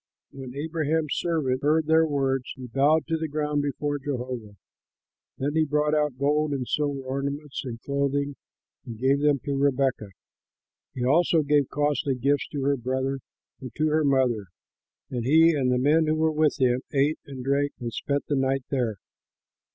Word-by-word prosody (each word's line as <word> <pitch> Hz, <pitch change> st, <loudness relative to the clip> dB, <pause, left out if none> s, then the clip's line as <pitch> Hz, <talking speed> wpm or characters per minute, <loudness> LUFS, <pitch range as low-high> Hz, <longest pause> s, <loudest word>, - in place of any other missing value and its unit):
When 130 Hz, -2 st, -9 dB
Abraham's 155 Hz, 0 st, -1 dB
servant 145 Hz, -7 st, 0 dB
heard 155 Hz, +2 st, +2 dB
their 160 Hz, +1 st, +4 dB
words, 135 Hz, -3 st, 0 dB
he 130 Hz, -, -9 dB
bowed 140 Hz, +6 st, +2 dB
to 165 Hz, 0 st, -1 dB
the 160 Hz, 0 st, -3 dB
ground 150 Hz, 0 st, -1 dB
before 145 Hz, 0 st, -2 dB
Jehovah. 125 Hz, -6 st, -5 dB, 0.8 s
Then 140 Hz, +2 st, -1 dB
he 160 Hz, 0 st, +3 dB
brought 150 Hz, 0 st, +1 dB
out 150 Hz, -4 st, +1 dB
gold 150 Hz, +2 st, +1 dB
and 130 Hz, -3 st, -3 dB
silver 145 Hz, -2 st, -1 dB
ornaments 140 Hz, +2 st, -4 dB
and 120 Hz, -3 st, -6 dB
clothing 140 Hz, 0 st, -1 dB, 0.5 s
and 115 Hz, -2 st, -8 dB
gave 135 Hz, +4 st, +2 dB
them 145 Hz, -1 st, +3 dB
to 140 Hz, -, -1 dB
Rebekah. 135 Hz, -5 st, +1 dB, 0.9 s
He 125 Hz, -, -2 dB
also 165 Hz, +3 st, +3 dB
gave 145 Hz, -1 st, +2 dB
costly 145 Hz, -2 st, 0 dB
gifts 140 Hz, +3 st, 0 dB
to 145 Hz, -3 st, -4 dB
her 140 Hz, 0 st, +2 dB
brother 130 Hz, +2 st, -2 dB, 0.4 s
and 130 Hz, -3 st, -8 dB
to 155 Hz, 0 st, +1 dB
her 155 Hz, +1 st, +2 dB
mother. 130 Hz, -7 st, +1 dB, 0.6 s
And 120 Hz, -2 st, -2 dB
he 160 Hz, +6 st, +5 dB
and 135 Hz, -5 st, +1 dB
the 125 Hz, -, +2 dB
men 155 Hz, +5 st, +3 dB
who 155 Hz, -, +2 dB
were 160 Hz, 0 st, +2 dB
with 155 Hz, 0 st, +1 dB
him 125 Hz, -1 st, +2 dB
ate 145 Hz, +2 st, +1 dB
and 135 Hz, -2 st, -7 dB
drank 140 Hz, +1 st, +1 dB
and 120 Hz, -2 st, -5 dB
spent 140 Hz, +4 st, -2 dB
the 145 Hz, -, -1 dB
night 135 Hz, 0 st, 0 dB
there. 125 Hz, -6 st, 0 dB
140 Hz, 175 wpm, -26 LUFS, 130-150 Hz, 0.9 s, he